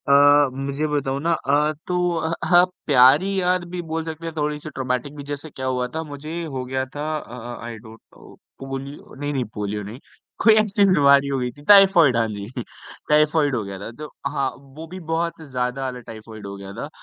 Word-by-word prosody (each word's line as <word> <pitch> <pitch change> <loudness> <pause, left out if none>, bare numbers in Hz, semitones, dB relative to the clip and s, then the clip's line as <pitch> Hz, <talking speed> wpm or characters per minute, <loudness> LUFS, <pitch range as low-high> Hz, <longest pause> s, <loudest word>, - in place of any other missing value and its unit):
अ, 145 0 +6
मुझे 140 +3 -3
बताऊँ 140 -2 -1
ना 170 +2 +1
अ, 150 0 +1
तो 180 - -1 0.2
अ 160 - -2
अ, - - -1
हाँ 175 -1 +7
आप 180 - +1 0.2
प्यारी 145 +9 +5
याद 180 0 +1
भी 180 0 -4
बोल 165 0 -1
सकते 160 0 -6
हैं, 165 - -4
थोड़ी-सी 150 0 -2
ट्रॉमेटिक 130 +1 -3
भी 145 - -7
जैसे 145 +2 -6
क्या 130 -2 -7
हुआ 125 -1 0
था 160 - -1
मुझे 155 +3 -6
हो 135 -5 -4
गया 130 +1 -2
था 145 - -3
अ 125 -5 -9 0.3
अ, - - -9
आई 115 -1 -6
डोंट 110 0 -14 0.2
नो - - -15 0.2
पोलि 135 0 -5 0.4
नहीं, 145 0 -2
नहीं 130 -2 0
पोलियो 105 0 -3
नहीं, 110 +6 -9 0.4
कोई 220 - +8
ऐसी 200 -1 +3
बीमारी 140 -3 +5
हो 140 -1 -1
गयी 125 -1 -2
थी 145 +4 -17
टाइफॉइड 190 - +7
हाँ 115 -1 +2
जी, 100 -1 -6 0.6
टाइफॉइड 150 -2 +3
हो 115 - -1
गया 100 -1 -7
था। 100 - -7
तो 150 -1 -7 0.2
हाँ, 135 -1 -1
वो 140 +4 -12
भी 185 +3 -8
बहुत 170 0 -2
ज़्यादा 125 +1 -2
वाला 130 -1 -4
टाइफॉइड 110 -2 -10
हो 100 - -7
गया 100 0 -9
था, - - -6
140 Hz, 215 wpm, -22 LUFS, 125-160 Hz, 0.6 s, कोई